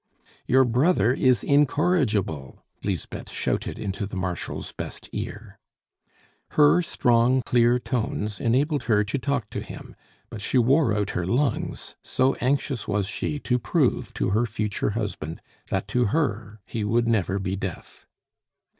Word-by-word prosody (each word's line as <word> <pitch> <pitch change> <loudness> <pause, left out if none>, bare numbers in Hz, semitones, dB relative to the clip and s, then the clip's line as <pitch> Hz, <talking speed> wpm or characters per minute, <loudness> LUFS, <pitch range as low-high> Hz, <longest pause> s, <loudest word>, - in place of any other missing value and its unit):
"Your 130 +1 +5
brother 125 - +3
is 130 -2 +3
incorrigible!" 140 - +1 0.2
Lisbeth 95 -5 -4
shouted - - -2
into 100 +1 -3
the 100 - -8
Marshal's 90 -1 -3
best - - -7
ear. - - -6 1.0
Her 150 +4 +6
strong, 125 -4 +2
clear 120 0 +4
tones 110 -5 -2
enabled 140 +5 +1
her 105 -3 +3
to 110 +7 -2
talk 140 -5 -2
to - - -3
him, - - -10 0.4
but 110 - -7
she 115 - 0
wore 130 +1 +4
out 105 -1 0
her 85 0 -2
lungs, 125 +4 -1
so 130 +1 +1
anxious 135 -2 0
was 100 -1 0
she 145 +8 -3
to 125 -1 +1
prove - - +1
to - - 0
her 110 +4 +2
future 105 -2 -2
husband 100 -7 -4 0.3
that - - -1
to 125 -1 +2
her 110 -6 -1
he 110 - -3
would 115 +3 +1
never 100 -4 +1
be 95 -1 -2
deaf. 95 -3 -7
115 Hz, 145 wpm, -25 LUFS, 100-130 Hz, 1.0 s, Her